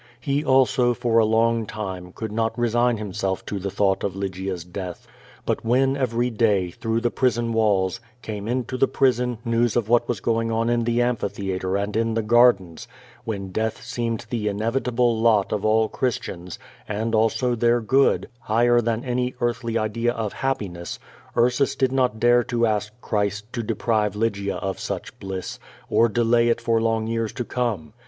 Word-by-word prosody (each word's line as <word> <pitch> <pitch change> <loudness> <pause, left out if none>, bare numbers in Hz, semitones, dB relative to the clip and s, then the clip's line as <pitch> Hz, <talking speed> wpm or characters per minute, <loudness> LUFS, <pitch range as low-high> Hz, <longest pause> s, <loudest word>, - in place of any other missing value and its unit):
He 140 +3 -1
also, 130 -3 +3
for 115 -1 +2
a 110 - +4
long 115 0 +2
time, 95 -5 -6
could 110 +3 -6
not 115 +1 -1
resign 120 0 +2
him 105 -3 -6
self 95 0 -2
to 100 - -4
the 100 +1 -3
thought 100 0 +1
of 95 -2 -2
Lygia's 95 -2 -4
death. 90 0 -7 0.4
But - - -1
when 130 +4 +2
every 125 -2 0
day, 105 -5 +1
through 115 +5 -2
the 120 0 0
prison 120 -2 0
walls, 100 -4 +1 0.2
came 105 -1 -5
into 125 +1 -2
the 135 - +3
prison, 125 -2 +1
news 115 0 +1
of 115 -3 0
what 120 0 +3
was 120 -4 -1
going 115 +1 0
on 115 +1 +1
in 120 -1 +1
the 120 +1 +2
amphitheatre 100 -5 -2
and 100 +1 -3
in 115 0 +1
the 115 - 0
gardens, 105 -7 +3 0.4
when 100 -4 -4
death 110 +3 -1
seejned 115 -1 -3
the 110 -3 -2
inevitable 115 +2 0
lot 110 -4 +3
of 105 - -2
all 110 +1 +3
Christians, 90 -9 -3 0.3
and 110 +2 -2
also 115 +3 +2
tlieir 120 0 +2
gcod, 135 +4 +3
higher 120 +1 +3
than 115 +2 -2
any 125 0 -1
earthly 120 -1 -1
idea 115 +2 0
of 110 -4 -3
happiness;, 100 -10 -3 0.4
Frsus 125 +3 +2
did 130 -1 +2
not 125 -4 +1
dare 120 +1 +4
to 120 -1 +1
ask 105 -1 -1
Christ 105 +2 -2
to 120 - -2
dejmve 110 -2 0
Lygia 100 -2 -1
of 95 -1 -4
such - - -5
bliss, 95 -1 -5 0.3
or 115 - +4
delay 120 +1 +3
it 115 - +2
for 115 -1 +1
hmg 115 -1 0
years 115 -1 -1
to 120 - -4
come. 110 -11 -2
115 Hz, 175 wpm, -23 LUFS, 105-120 Hz, 0.4 s, a